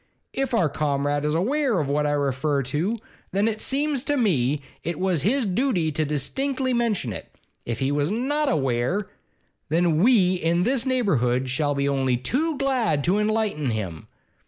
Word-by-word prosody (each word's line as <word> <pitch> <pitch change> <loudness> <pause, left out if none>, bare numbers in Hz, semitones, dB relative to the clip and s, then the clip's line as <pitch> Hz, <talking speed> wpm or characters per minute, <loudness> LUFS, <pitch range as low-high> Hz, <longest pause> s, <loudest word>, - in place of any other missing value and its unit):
If 270 -2 -1
our 180 -8 +3
Comrade 145 0 -1
is 150 +1 +1
aweer 250 - +1
of 150 - -1
what 150 +1 +1
I 145 - +1
refer 140 0 0
to, 160 - -1 0.4
then 200 +3 +2
it 220 -1 -1
seems 280 -1 0
to 290 -1 +1
me 150 - +2 0.2
it 170 -1 -3
was 185 -5 +1
his 245 - +1
dooty 195 - +1
to 155 +1 -1
distinctly 255 - -1
mention 220 - 0
it. - - -9 0.4
If 115 -1 -2
he 135 0 0
was 145 +1 +1
not 275 +7 0
aweer, 135 - 0 0.6
then 165 0 +2
we 195 -3 +4
in 170 +1 +1
this 255 +3 0
neighbourhood 130 - +1
shall 145 +2 0
be 140 0 0
only 135 -3 +1
too 285 - -1
glad 250 - +1
to 190 +6 +2
enlighten 210 - 0
him. 95 -8 -4
170 Hz, 170 wpm, -24 LUFS, 140-235 Hz, 0.6 s, we